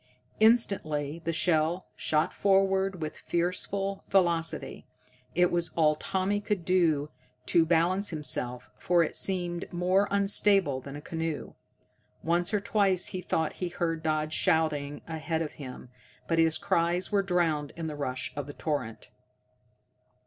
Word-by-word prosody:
Instantly 170 -10 +2
the 165 - +1
shell 165 +1 +1
shot 155 0 0
forward 195 -2 +2
with 155 - -5
fearful 195 +3 -2
velocity. 170 -4 0 0.5
It 180 +1 +3
was 170 -1 +1
all 155 -2 +4
Tommy 190 +5 -1
could 200 -4 -2
do 160 -5 +2 0.3
to 165 -1 +3
balance 175 +4 +2
himself, 125 -6 -1
for 175 -1 +3
it 160 - -3
seemed 175 -2 -2
more 185 +3 +2
unstable 195 -7 +3
than 140 +2 -9
a 145 - -7
canoe. 160 -1 -4 0.7
Once 175 +3 +1
or 210 - +2
twice 195 -3 +2
he 185 - -3
thought 160 -2 -1
he 180 - -1
heard 165 -2 -2
Dodd 155 0 -1
shouting 150 -3 +1
ahead 160 0 -2
of 150 - -6
him, 125 -2 -9 0.4
but 165 -1 +1
his 160 -1 +4
cries 170 +4 0
were 200 -1 +3
drowned 165 -6 0
in 165 -1 -5
the 155 -2 -4
rush 130 -3 -3
of 145 -1 -4
the 145 - -7
torrent. 145 -9 -4
170 Hz, 140 wpm, -28 LUFS, 155-185 Hz, 0.7 s, all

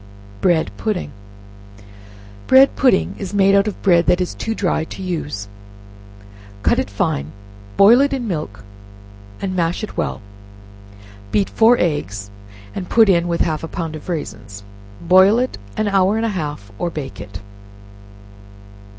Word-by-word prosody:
Bread 170 -3 +2
Pudding. 215 -5 -3 1.4
Bread 265 +1 +6
pudding 255 -8 +2
is 195 0 -5
made 195 0 +4
out 200 +1 +4
of 210 - -4
bread 175 -3 +4
that 180 0 +3
is 180 - -2
too 225 - -4
dry 180 -6 0
to - - -10
use; 150 - -4 1.2
cut - - +2
it - - -2
fine, 70 +2 -2 0.5
boil 230 +6 +7
it 280 - +2
in 260 -4 -3
milk, 150 - -5 0.8
and 185 -1 -2
mash 170 +2 -1
it 215 - -7
well; - - -2 1.1
beat 105 -2 +1
four 230 +2 +5
eggs 105 - -2 0.4
and 180 - -6
put 225 -3 +5
in, 175 -2 +3
with 170 -1 -1
half 155 -1 -1
a - - -4
pound 165 -2 -5
of 155 - -10
raisins; 105 - -6 0.4
boil 185 +5 +5
it 255 - -2 0.2
an 215 - 0
hour 195 +1 +2
and 225 - 0
a - - 0
half, 150 - -5
or 175 - -1
bake 150 -5 -7
it. 100 -2 -9
180 Hz, 150 wpm, -19 LUFS, 155-205 Hz, 1.4 s, boil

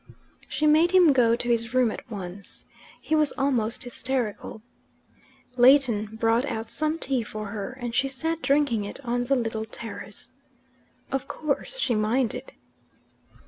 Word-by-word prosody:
She 305 - -1
made 315 +4 +5
him 355 -6 +7
go 235 -3 +4
to 240 - -4
his 230 0 0
room 250 -3 +4
at - - -9
once: 195 -2 -8 0.3
he 315 - -4
was 305 -2 +3
almost 245 -5 0
hysterical. 245 -3 -4 0.9
Leighton 245 -5 +4
brought 225 +2 +2
out 225 -4 -4
some 310 +1 -1
tea 265 -5 -1
for 215 -1 -6
her, 205 +3 -5
and 240 -2 -4
she 255 +3 +2
sat 320 +5 -3
drinking 275 -6 +2
it 200 - -6
on 245 +1 0
the 275 +2 +2
little 225 -3 -2
terrace. 225 +1 -9 0.8
Of 270 0 -2
course 305 - -3
she 280 - +1
minded. 225 +3 -1
245 Hz, 145 wpm, -26 LUFS, 225-280 Hz, 0.9 s, him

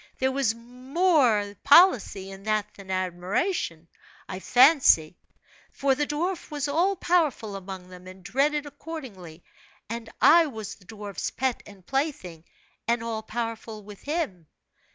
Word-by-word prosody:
There 265 0 +1
was 265 -4 +1
more 250 - +1
policy 255 - +5
in 195 0 -10
that 215 -1 -1
than 195 -1 -13
admiration, 185 - -2 0.4
I 185 - -6
fancy; 250 - +5 0.5
for 275 -1 +1
the 290 +2 -1
dwarf 340 +4 -2
was 295 -2 -2
all 345 +7 +2
powerful 310 - 0
among 190 -1 -8
them 180 0 -12
and 185 0 -12
dreaded 290 +7 +1
accordingly, 225 - -9 0.5
and 230 0 -5
I 330 0 +6
was 220 -5 -6
the 185 - -19
dwarf's 205 -2 -5
pet 260 -2 -2
and 195 -3 -15
plaything, 265 - -3 0.4
and 235 0 +1
all 225 -1 -3
powerful 225 -1 -5
with 205 -1 -12
him. 285 - -3
230 Hz, 135 wpm, -26 LUFS, 195-290 Hz, 0.5 s, I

